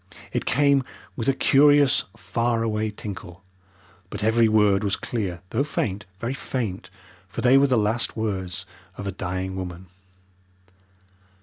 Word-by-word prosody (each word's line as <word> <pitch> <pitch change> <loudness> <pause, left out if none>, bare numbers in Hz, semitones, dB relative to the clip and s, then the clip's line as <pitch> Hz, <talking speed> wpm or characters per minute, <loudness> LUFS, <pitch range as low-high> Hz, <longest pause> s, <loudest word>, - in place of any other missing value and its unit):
It - - -2
came 140 0 +3 0.3
with 115 - -3
a 135 - +4
curious 145 0 +5
faraway 115 -2 0
tinkle, 95 -4 -8 0.7
but 100 +1 -4
every 115 +1 +4
word 105 -2 +4
was 100 -1 +1
clear, 95 -8 -4
though 125 +5 +1
faint 105 -9 -3
very 120 +3 -2
faint, 115 -8 -4 0.4
for 90 - -5
they 125 +1 +5
were 140 +1 +6
the 130 -2 +2
last 110 +3 +1
words 95 -4 -3 0.3
of 100 - -6
a 100 - -2
dying 95 0 -4
woman. 90 -1 -6
110 Hz, 135 wpm, -24 LUFS, 95-125 Hz, 0.7 s, were